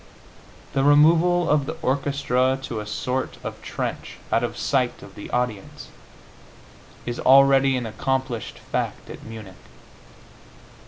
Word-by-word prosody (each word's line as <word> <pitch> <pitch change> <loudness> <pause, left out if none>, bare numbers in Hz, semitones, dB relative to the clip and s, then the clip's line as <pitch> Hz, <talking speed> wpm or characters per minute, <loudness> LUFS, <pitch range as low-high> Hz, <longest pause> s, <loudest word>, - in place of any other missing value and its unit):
The 135 - +1
removal 165 +4 +5
of 145 -2 +2
the 160 - -5
orchestra 130 -2 +1
to 115 -4 -4
a 105 - -6
sort 125 +4 -3
of - - -6
trench, - - -5
out 115 - +2
of 120 0 -3
sight 130 -3 0
of 100 - -12
the 100 - -9
audience, 120 -5 -3 1.2
is 120 0 -4
already 135 0 +5
an 125 - -3
accomplished 125 +1 -3
fact - - -4
at - - -10
Munich. 110 -4 -9
130 Hz, 125 wpm, -23 LUFS, 120-140 Hz, 1.2 s, removal